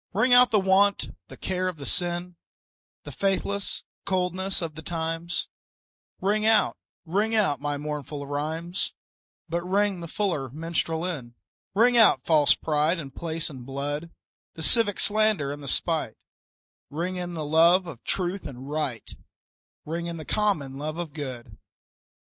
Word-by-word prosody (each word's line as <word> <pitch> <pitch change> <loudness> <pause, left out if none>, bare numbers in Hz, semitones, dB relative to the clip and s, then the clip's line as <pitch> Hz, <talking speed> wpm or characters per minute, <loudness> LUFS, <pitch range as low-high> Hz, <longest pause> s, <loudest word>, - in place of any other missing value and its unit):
Ring 235 +6 +3
out 250 0 +8
the 215 - +4
want, 195 +1 +3
the - - -11
care 185 0 -1
the 150 -5 -9
sin, 175 +2 0 0.7
The - - -8
faithless 200 +1 -1 0.2
coldness 185 +1 0
of 165 -3 -4
the 160 - -8
times; 165 +1 -3 0.7
Ring 210 +2 +1
out, 220 -1 +4 0.3
ring 205 +7 +1
out 195 -10 +2
my 145 0 -1
mournful 145 -1 -5
rhymes, 160 +5 -3 0.5
But 170 +1 -1
ring 195 +1 +1
the 170 - -6
fuller 165 -8 -1
minstrel 165 +3 -2
in. 130 -10 -5 0.4
Ring 240 +3 +5
out 225 -2 +6
false 155 -3 +5
pride 155 +3 +1
in 140 -5 -6
place 165 +3 -2
and 130 -5 -8
blood, 145 +5 -3 0.5
The 160 - -4
civic 205 +1 +4
slander 215 -9 +3
and 145 0 -6
the 140 - -8
spite; - - 0 0.7
Ring 175 +5 -3
in 175 -1 -4
the 155 -2 -3
love 170 +5 +5
of 145 -9 -9
truth 185 0 -2
and 130 -1 -9
right, 145 -5 -3 0.8
Ring 170 +2 -3
in 170 -1 -4
the 155 - -8
common 155 -11 0
love 155 +2 -4
of 170 -4 -5
good. 130 -6 -7
170 Hz, 150 wpm, -26 LUFS, 150-190 Hz, 0.8 s, out